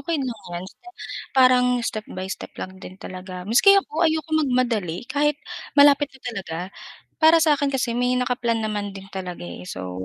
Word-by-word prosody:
okey 335 Hz, -1 st, -1 dB
lang 245 Hz, -5 st, -4 dB
'yan, 175 Hz, +1 st, -4 dB
basta 360 Hz, -, -14 dB, 0.5 s
parang 255 Hz, -1 st, +6 dB, 0.2 s
step 215 Hz, -1 st, -3 dB
by 185 Hz, -, -6 dB
step -, -, -6 dB
lang 185 Hz, 0 st, -7 dB
din 185 Hz, -, -10 dB
talaga 185 Hz, 0 st, -8 dB
maski 275 Hz, -, +6 dB
ako, 320 Hz, -4 st, -6 dB
ayokong 315 Hz, 0 st, 0 dB
magmadali 230 Hz, -9 st, 0 dB
kahit 295 Hz, 0 st, +1 dB, 0.4 s
malapit 285 Hz, 0 st, +6 dB
na 265 Hz, -, -17 dB
talaga. 195 Hz, -9 st, -5 dB, 0.6 s
Para 320 Hz, +1 st, +7 dB
sa 310 Hz, -1 st, +4 dB
akin 285 Hz, 0 st, 0 dB
kasi 255 Hz, -3 st, 0 dB
may 250 Hz, +1 st, +1 dB
naka-plan 245 Hz, -2 st, 0 dB
naman 205 Hz, -2 st, -3 dB
din 195 Hz, -, -9 dB
talaga 180 Hz, -, -6 dB
eh. 85 Hz, +1 st, -8 dB
So 90 Hz, 0 st, -6 dB
240 Hz, 180 wpm, -23 LUFS, 185-285 Hz, 0.6 s, Para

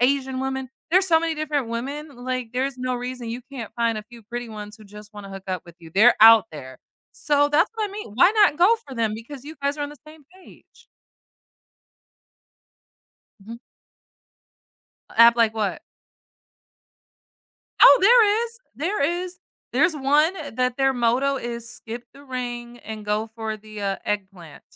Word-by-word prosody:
Asian 265 Hz, 0 st, +1 dB
women, 265 Hz, -1 st, -3 dB, 0.2 s
there's 375 Hz, +2 st, +4 dB
so 325 Hz, -2 st, +4 dB
many 330 Hz, -1 st, -1 dB
different 295 Hz, -5 st, -2 dB
women, 280 Hz, +6 st, -5 dB
like, 250 Hz, -1 st, -4 dB
there's 260 Hz, +1 st, -2 dB
no 255 Hz, 0 st, -2 dB
reason 245 Hz, -1 st, -6 dB
you 240 Hz, +2 st, -5 dB
can't 240 Hz, -6 st, -7 dB
find 230 Hz, -1 st, 0 dB
a -, -, -7 dB
few 235 Hz, +1 st, -15 dB
pretty 240 Hz, +2 st, -6 dB
ones 210 Hz, 0 st, -8 dB
who 215 Hz, -, -16 dB
just 210 Hz, +1 st, -13 dB
wanna 200 Hz, -1 st, -9 dB
hook 195 Hz, 0 st, -9 dB
up 185 Hz, -2 st, -3 dB
with 170 Hz, -1 st, -15 dB
you, 165 Hz, -1 st, -14 dB
they're 225 Hz, +5 st, +6 dB
out 225 Hz, 0 st, +9 dB
there. 130 Hz, -4 st, -9 dB, 0.4 s
So, 290 Hz, -1 st, +1 dB
that's 295 Hz, +1 st, +2 dB
what 430 Hz, -2 st, -2 dB
I -, -, -13 dB
mean. 410 Hz, -, -8 dB
Why 350 Hz, -, +6 dB
not 410 Hz, -9 st, +4 dB
go 420 Hz, +7 st, +5 dB
for 265 Hz, -, -9 dB
them, 225 Hz, -2 st, 0 dB
because 245 Hz, +4 st, -9 dB
you 310 Hz, +2 st, -9 dB
guys 280 Hz, +1 st, 0 dB
are -, -, -2 dB
on 290 Hz, -, -3 dB
the 295 Hz, -, -12 dB
same 305 Hz, -2 st, -15 dB, 0.2 s
page? -, -, -20 dB, 2.5 s
Mhm. 230 Hz, +4 st, -10 dB, 1.6 s
App 235 Hz, +1 st, +7 dB
like 225 Hz, -1 st, +3 dB
what? 215 Hz, +6 st, -2 dB, 2.0 s
Oh, 280 Hz, -, +9 dB
there 440 Hz, +1 st, +5 dB
is, 465 Hz, 0 st, -10 dB, 0.2 s
there 345 Hz, +4 st, -2 dB
is. 350 Hz, +4 st, -2 dB, 0.3 s
There's 315 Hz, +6 st, +3 dB
one 300 Hz, +5 st, +2 dB, 0.2 s
that 250 Hz, -1 st, 0 dB
their 270 Hz, -1 st, +2 dB
motto 250 Hz, +3 st, +1 dB
is 235 Hz, -2 st, -6 dB
"Skip 235 Hz, +1 st, -8 dB
the 280 Hz, +1 st, -16 dB
ring 240 Hz, -2 st, -6 dB
and 220 Hz, -2 st, -8 dB
go 210 Hz, +2 st, -1 dB
for 220 Hz, -1 st, -4 dB
the, 215 Hz, 0 st, -11 dB
uh, 195 Hz, -1 st, -1 dB
eggplant." 190 Hz, -7 st, -5 dB
250 Hz, 170 wpm, -23 LUFS, 220-290 Hz, 2.5 s, out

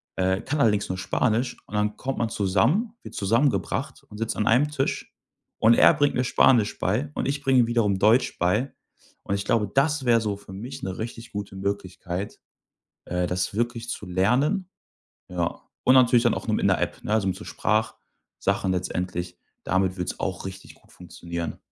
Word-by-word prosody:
äh, 95 Hz, 0 st, +1 dB
kann 145 Hz, +1 st, -1 dB
allerdings 105 Hz, -4 st, +2 dB
nur 95 Hz, -, -2 dB
Spanisch 115 Hz, +6 st, 0 dB
und 105 Hz, -, -7 dB
dann 105 Hz, 0 st, 0 dB
kommt 135 Hz, 0 st, -3 dB
man 115 Hz, -, 0 dB
zusammen, 115 Hz, -, +1 dB
wird -, -, -10 dB
zusammengebracht 115 Hz, +2 st, 0 dB
und 105 Hz, -, -10 dB
sitzt 115 Hz, -, -2 dB
an 105 Hz, -, 0 dB
einem 130 Hz, +6 st, +4 dB
Tisch 135 Hz, -2 st, -2 dB, 0.5 s
und 115 Hz, +1 st, +6 dB
er -, -, +7 dB
bringt 145 Hz, 0 st, +1 dB
mir 125 Hz, -, +1 dB
Spanisch 120 Hz, -4 st, +3 dB
bei 120 Hz, +10 st, 0 dB
und -, -, -1 dB
ich 140 Hz, 0 st, -1 dB
bringe 130 Hz, -1 st, +4 dB
ihm 115 Hz, -, +2 dB
wiederum 110 Hz, -5 st, +1 dB
Deutsch 110 Hz, +6 st, +3 dB
bei. 105 Hz, +10 st, +1 dB, 0.5 s
Und 100 Hz, -, -1 dB
ich 100 Hz, 0 st, -3 dB
glaube, 105 Hz, -3 st, +1 dB
das 145 Hz, 0 st, +2 dB
wär 120 Hz, -1 st, +5 dB
so 105 Hz, -2 st, -1 dB
für 100 Hz, -1 st, -14 dB
mich 115 Hz, +7 st, -7 dB
'ne 95 Hz, -1 st, -4 dB
richtig 115 Hz, +1 st, -6 dB
gute 100 Hz, -1 st, -6 dB
Möglichkeit, 95 Hz, -1 st, -4 dB, 0.7 s
äh, 90 Hz, 0 st, -1 dB
das 90 Hz, +2 st, -2 dB
wirklich 120 Hz, +1 st, -2 dB
zu 105 Hz, -, -5 dB
lernen, 125 Hz, -, +1 dB, 0.6 s
ja. 85 Hz, -2 st, -2 dB, 0.2 s
Und 130 Hz, -, +6 dB
natürlich 125 Hz, -2 st, +6 dB
dann 120 Hz, -, +3 dB
auch -, -, -6 dB
noch -, -, +2 dB
mit -, -, 0 dB
'ner -, -, +3 dB
App, -, -, -3 dB
ne? 105 Hz, -, -2 dB
Also, 110 Hz, -3 st, +1 dB
mit 95 Hz, -, -1 dB
so -, -, -10 dB
Sprachsachen 110 Hz, -3 st, -2 dB
letztendlich. 90 Hz, -1 st, -3 dB, 0.3 s
Damit 95 Hz, 0 st, +1 dB
wird's 90 Hz, -, -4 dB
auch 95 Hz, 0 st, -3 dB
richtig 95 Hz, 0 st, -9 dB
gut -, -, -26 dB
funktionieren. 85 Hz, -1 st, -6 dB
105 Hz, 190 wpm, -25 LUFS, 95-120 Hz, 0.7 s, er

